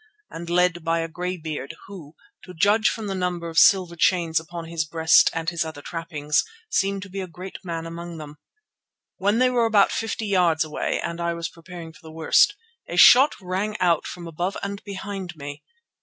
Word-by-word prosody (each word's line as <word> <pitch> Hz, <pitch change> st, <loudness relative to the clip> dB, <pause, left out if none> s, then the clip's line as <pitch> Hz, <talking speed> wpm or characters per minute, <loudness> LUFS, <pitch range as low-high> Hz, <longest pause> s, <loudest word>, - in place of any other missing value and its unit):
and 170 Hz, +1 st, -7 dB
led 175 Hz, -1 st, +2 dB
by 165 Hz, +1 st, +1 dB
a 165 Hz, -, -3 dB
grey 180 Hz, +2 st, -4 dB
beard 155 Hz, -2 st, -6 dB
who, 170 Hz, -7 st, -11 dB, 0.3 s
to 180 Hz, -, -11 dB
judge 210 Hz, +6 st, +3 dB
from 220 Hz, -, -5 dB
the 195 Hz, -, -3 dB
number 180 Hz, -2 st, -2 dB
of 165 Hz, -, +2 dB
silver 185 Hz, -4 st, +5 dB
chains 165 Hz, -1 st, +2 dB
upon 165 Hz, +1 st, -8 dB
his 165 Hz, -1 st, -2 dB
breast 160 Hz, +1 st, +4 dB
and 165 Hz, +1 st, -2 dB
his 170 Hz, -2 st, -1 dB
other 155 Hz, -3 st, -8 dB
trappings, 155 Hz, -3 st, -1 dB, 0.3 s
seemed 195 Hz, 0 st, 0 dB
to 200 Hz, -, -11 dB
be 195 Hz, +1 st, -4 dB
a 185 Hz, -, -5 dB
great 180 Hz, +3 st, -9 dB
man 165 Hz, -2 st, -4 dB
among 170 Hz, 0 st, -7 dB
them. 150 Hz, -1 st, -10 dB, 0.8 s
When 205 Hz, +3 st, +1 dB
they 255 Hz, +1 st, +3 dB
were 240 Hz, -2 st, +2 dB
about 210 Hz, -3 st, +4 dB
fifty 225 Hz, 0 st, -3 dB
yards 180 Hz, -6 st, +2 dB
away 155 Hz, -1 st, -2 dB
and 170 Hz, 0 st, -4 dB
I 170 Hz, 0 st, -1 dB
was 170 Hz, 0 st, -4 dB
preparing 165 Hz, -1 st, -11 dB
for -, -, -18 dB
the 160 Hz, -, -12 dB
worst, 165 Hz, -, +3 dB, 0.3 s
a -, -, -4 dB
shot 270 Hz, +4 st, +8 dB
rang 195 Hz, +3 st, -3 dB
out 170 Hz, -3 st, +2 dB
from 175 Hz, -1 st, -8 dB
above 175 Hz, +4 st, -3 dB
and 200 Hz, 0 st, -5 dB
behind 195 Hz, -3 st, -6 dB
me. 145 Hz, -1 st, -8 dB
175 Hz, 200 wpm, -24 LUFS, 165-195 Hz, 0.8 s, shot